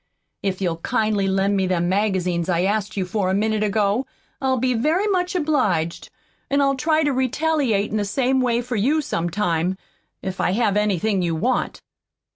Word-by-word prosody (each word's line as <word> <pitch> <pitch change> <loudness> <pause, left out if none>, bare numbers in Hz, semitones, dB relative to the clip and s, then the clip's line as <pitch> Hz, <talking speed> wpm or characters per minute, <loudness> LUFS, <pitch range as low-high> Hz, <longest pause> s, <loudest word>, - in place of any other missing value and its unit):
If 195 -1 -2
you'll 170 -3 0
kindly 215 +1 0
lend 195 +1 +1
me 190 -1 +1
them 175 -1 0
magazines 185 -3 0
I 175 0 +2
asked 205 +1 -1
you 190 - 0
for 185 0 -1
a 190 - +1
minute 215 +1 0
ago, 210 +3 +1 0.3
I'll 260 -1 +1
be 255 +1 +1
very 310 - +1
much 365 -3 0
obliged, 235 - 0 0.4
an' 280 - +2
I'll 275 -1 +3
try 310 +4 +1
to 290 -2 +1
retaliate 260 -4 0
in 215 - 0
the 210 - 0
same 260 +6 +1
way 240 -1 +1
for 245 0 -4
you 285 +9 +1
some 170 -8 -2
time, 175 -1 0 0.5
if 190 -1 -3
I 180 - +1
have 215 -2 +1
anything 210 -1 +1
you 170 -2 0
want." 240 +11 -1
210 Hz, 185 wpm, -22 LUFS, 190-260 Hz, 0.5 s, I'll